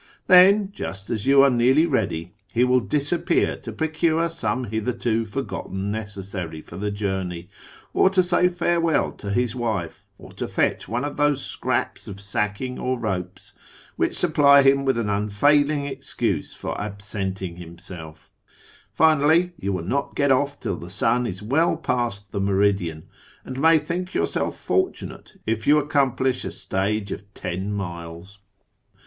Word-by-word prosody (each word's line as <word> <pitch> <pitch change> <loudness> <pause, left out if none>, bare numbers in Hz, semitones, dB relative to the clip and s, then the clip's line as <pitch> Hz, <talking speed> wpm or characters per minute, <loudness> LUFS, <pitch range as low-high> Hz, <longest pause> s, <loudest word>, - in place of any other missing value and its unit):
Then, 195 +2 +6
just 100 - -6
as 110 +1 -2
you 135 0 +7
are 140 - +5
nearly 130 +6 +4
ready, 90 - -1 0.2
he 120 +5 +2
will 125 0 +4
disappear 145 - +1
to - - -8
pro 160 - -1
cure 165 +1 +1
some 130 -7 -2
hitherto 115 0 -1
forgotten 100 -5 -4
necessary 95 -6 -5
for 85 - -12
the 105 +3 -2
journey, 95 -4 -3 0.4
or - - +5
to 190 -1 +3
say 180 0 +3
farewell 170 -2 +1
to 100 - -8
his 120 +3 0
wife, 110 -9 -3
or - - -13
to - - -5
fetch - - 0
one 120 +5 -2
of 145 - -5
those 145 -2 +1
scraps - - -2
of 100 -1 -8
sacking 105 +5 -3
or 130 0 -1
ropes 95 -5 -4 0.4
which - - 0
supply 140 -1 +5
him 140 0 +4
with 135 -3 +2
an 115 -3 -1
unfailing 140 +9 +2
excuse 140 - -3
for - - -5
absenting 100 -3 -4
himself 85 -2 -10 0.6
Finally, 160 +3 +4
you 100 - -2
will 90 -3 -2
not 140 +8 -2
get 140 -1 +2
off 140 +2 +1
till 95 - -3
the 85 - -9
sun 115 +5 +1
is 95 0 -6
well 155 +9 +2
past 120 -9 -2
the 100 - -2
meridian, 95 -5 +1 0.4
and 130 0 -6
may 165 +1 +6
think 175 +4 -4
yourself - - -1
fortunate 375 - -3
if 110 0 -2
you 150 +1 +6
accomplish 135 -3 +1
a - - -3
stage 100 +1 -2
of 100 0 -7
ten 95 +3 -4
miles. 85 0 -6
115 Hz, 155 wpm, -23 LUFS, 100-145 Hz, 0.6 s, you